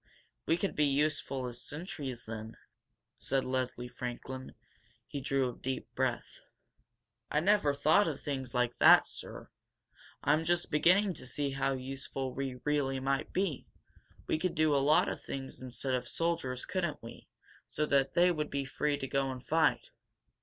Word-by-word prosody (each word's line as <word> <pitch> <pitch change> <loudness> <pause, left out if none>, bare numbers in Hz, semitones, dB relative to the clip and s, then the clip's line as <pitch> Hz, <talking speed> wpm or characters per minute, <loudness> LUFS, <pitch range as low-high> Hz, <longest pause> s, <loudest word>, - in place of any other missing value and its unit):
'We 165 - +3
could 195 +2 -2
be 150 - +3
useful 140 -2 0
as 120 0 -4
sentries, 145 -6 -5
then?" 110 0 -7 0.6
said 135 0 0
Leslie 130 -1 -2
Franklin. 125 +2 -6 0.5
He 140 - -5
drew 135 -1 +1
a 125 - -5
deep 130 -2 -4
breath. 130 -1 -2 0.9
"I 150 - +2
never 170 -5 +3
thought 155 +7 +4
of 150 -4 -3
things 135 -4 -4
like 125 -1 0
that, - - +8
sir! - - -9 0.7
I'm 150 +3 +3
just 175 +1 0
beginning 185 +6 +4
to 140 - -5
see 140 +2 -1
how 135 0 0
useful 130 0 -4
we 130 -2 -4
really 140 -3 +1
might 135 +1 -1
be. 185 -7 -1 0.6
We 155 - 0
could 180 +1 -1
do 155 -2 +3
a 140 - +3
lot 150 +2 +5
of - - -4
things 135 -1 -6
instead 130 +1 -3
of 125 - -1
soldiers, 150 -7 -1
couldn't 170 -8 -2
we? 115 - -11 0.4
So 150 - -1
that 140 -2 +2
they 180 +1 +5
would 150 -3 -2
be 140 -1 -2
free 145 +2 0
to 135 - -4
go 135 0 0
and 130 -1 -6
fight?" 165 - +2
135 Hz, 165 wpm, -32 LUFS, 130-155 Hz, 0.9 s, that